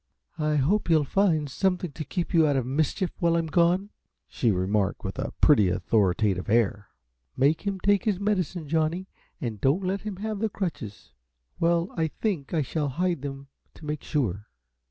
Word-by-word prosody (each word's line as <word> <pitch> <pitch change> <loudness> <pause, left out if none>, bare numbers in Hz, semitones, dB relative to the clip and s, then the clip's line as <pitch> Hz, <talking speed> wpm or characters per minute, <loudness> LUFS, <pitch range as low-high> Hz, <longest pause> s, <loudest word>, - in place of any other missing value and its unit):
"I 150 0 +1
hope 170 +9 +1
you'll 160 -2 +5
find 160 -1 +1
something 180 +3 -1
to 155 - -6
keep 175 +5 -3
you 165 -2 +5
out 145 - +2
of 130 -3 0
mischief 155 +7 0
while 170 -2 +2
I'm 165 -1 +1
gone," 175 +5 +2 0.4
she 120 - 0
remarked, 95 +1 0
with - - -5
a - - -2
pretty, 105 -11 +5
authoritative 95 0 +1
air. 105 -2 +1 0.5
"Make 150 +9 +2
him 195 -1 -1
take 205 +3 +2
his 205 -4 +1
medicine, 185 -5 -1
Johnny, 165 +4 0 0.3
and 115 - -4
don't 150 +9 +2
let 190 +2 -1
him 210 -2 -5
have 215 +2 -4
the 220 +1 0
crutches. 155 - -5 0.5
Well, 170 +1 +2
I 160 -1 +1
think 160 -3 -3
I 160 -3 +1
shall 145 +2 -2
hide 175 +2 -1
them 135 -1 -7 0.3
to 155 - -12
make 150 -1 -3
sure." 105 - -2
155 Hz, 175 wpm, -26 LUFS, 130-185 Hz, 0.5 s, you'll